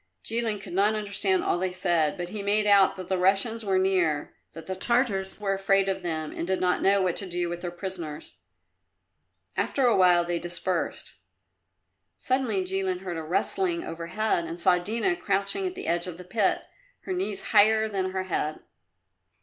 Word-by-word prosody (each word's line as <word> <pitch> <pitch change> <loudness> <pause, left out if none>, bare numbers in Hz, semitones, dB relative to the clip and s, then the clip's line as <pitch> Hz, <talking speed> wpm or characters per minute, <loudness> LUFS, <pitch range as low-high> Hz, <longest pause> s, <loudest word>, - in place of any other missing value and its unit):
Jilin 225 -2 0
could 195 - -9
not 205 +3 +3
understand 200 -3 0
all 175 - 0
they 185 0 -1
said, 170 -4 +1
but 175 -1 -4
he 210 +1 -5
made 205 +1 +2
out 200 -2 +5
that 185 -2 -8
the 190 -1 0
Russians 200 +5 +1
were 195 -2 +1
near, 180 -6 +1 0.2
that 165 0 -10
the 190 - -3
Tartars 205 -3 0
were 200 -2 0
afraid 195 0 +2
of 190 -1 -1
them 160 -3 -3
and 170 - -5
did 190 0 0
not 180 -1 +1
know 195 0 +3
what 180 -2 0
to 195 - -1
do 175 0 -1
with 175 0 -5
their 175 - -3
prisoners. 175 -4 -7 1.2
After 270 - 0
a 240 - +4
while 175 -2 +5
they 175 0 -1
dispersed. 175 +1 -3 1.0
Suddenly 255 -7 0
Jilin 190 -1 -1
heard 180 -3 -5
a - - -3
rustling 340 - 0
overhead 170 +3 -2
and 165 +1 -6
saw 180 0 +4
Dina 230 - 0
crouching 200 - -1
at 365 - -6
the 385 - -7
edge 170 +1 0
of 175 -2 -7
the 180 - -9
pit, 200 +2 +1 0.4
her 375 - -4
knees 360 - -3
higher 220 +1 +5
than 190 -3 -2
her 190 0 -2
head. 155 -4 -2
190 Hz, 185 wpm, -27 LUFS, 175-210 Hz, 1.2 s, out